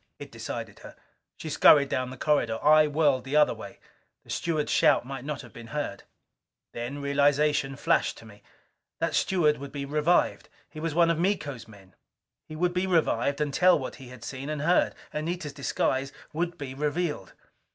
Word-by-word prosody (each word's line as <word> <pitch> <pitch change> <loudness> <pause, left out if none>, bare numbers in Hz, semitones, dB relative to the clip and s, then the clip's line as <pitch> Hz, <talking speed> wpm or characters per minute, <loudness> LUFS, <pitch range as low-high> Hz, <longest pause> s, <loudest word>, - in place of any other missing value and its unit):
It - - -10
decided - - -6
her. - - -12 0.4
She - - -8
scurried 145 -1 +6
down 130 0 -1
the 130 - -9
corridor. 125 -6 +1
I 155 +1 +6
whirled 145 -4 +2
the 135 +2 -4
other 150 0 +5
way. - - -10 0.5
The - - -11
steward's 155 -3 -1
shout - - +4
might 135 -1 -6
not 150 0 -5
have 120 - -14
been 115 -1 -10
heard. 115 -5 -4 0.7
Then 125 +5 -5
realization 140 0 +2
flashed 140 - +1
to - - -13
me. 105 -2 -15 0.6
That - - -1
steward 155 -6 +2
would 140 0 -8
be 140 -1 -5
revived. 150 +4 +1 0.2
He 155 - -11
was 160 -1 -3
one 170 -1 +4
of 165 - -1
Miko's 150 - -2
men. 100 -4 -17 0.5
He 155 - -8
would 175 +2 0
be 180 +1 0
revived 140 -6 +1
and 150 -2 -1
tell 180 +2 +5
what 135 - -6
he 130 - -12
had 125 -2 -12
seen 135 +3 -6
and 150 -1 -3
heard. 175 +3 +2 0.2
Anita's 155 -1 -3
disguise 135 0 -1 0.2
would 170 +2 -2
be 140 -4 -6
revealed. 150 - -2
145 Hz, 185 wpm, -27 LUFS, 135-155 Hz, 0.7 s, scurried